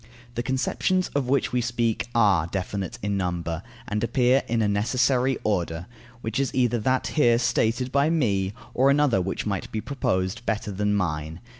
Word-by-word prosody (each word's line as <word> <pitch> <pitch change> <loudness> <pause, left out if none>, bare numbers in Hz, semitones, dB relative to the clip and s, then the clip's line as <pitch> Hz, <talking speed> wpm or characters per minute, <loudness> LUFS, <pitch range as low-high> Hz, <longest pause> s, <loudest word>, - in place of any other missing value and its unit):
The 120 - -2
conceptions 130 +9 0
of 140 -3 -1
which 140 -1 +1
we 125 - +2
speak 120 -1 -1
are 100 -8 +4
definite 95 0 -4
in 100 -1 0
number, 85 -3 -2 0.3
and 105 +1 -2
appear 125 +2 +3
in 115 -1 +1
a - - +2
necessary 125 +5 +2
order, 90 -4 -1 0.4
which 110 +2 -2
is 135 -2 +1
either 120 -2 +2
that 130 +4 +1
here 120 -6 +3
stated 120 +1 +1
by 140 +2 +3
me, 105 - +1 0.2
or 135 +2 +4
another 140 -8 +3
which 95 +2 -3
might 100 -3 -3
be 110 - -2
proposed, 110 -4 -2
better 110 -2 -2
than 105 +1 0
mine. 80 -3 -2
115 Hz, 170 wpm, -25 LUFS, 95-130 Hz, 0.4 s, are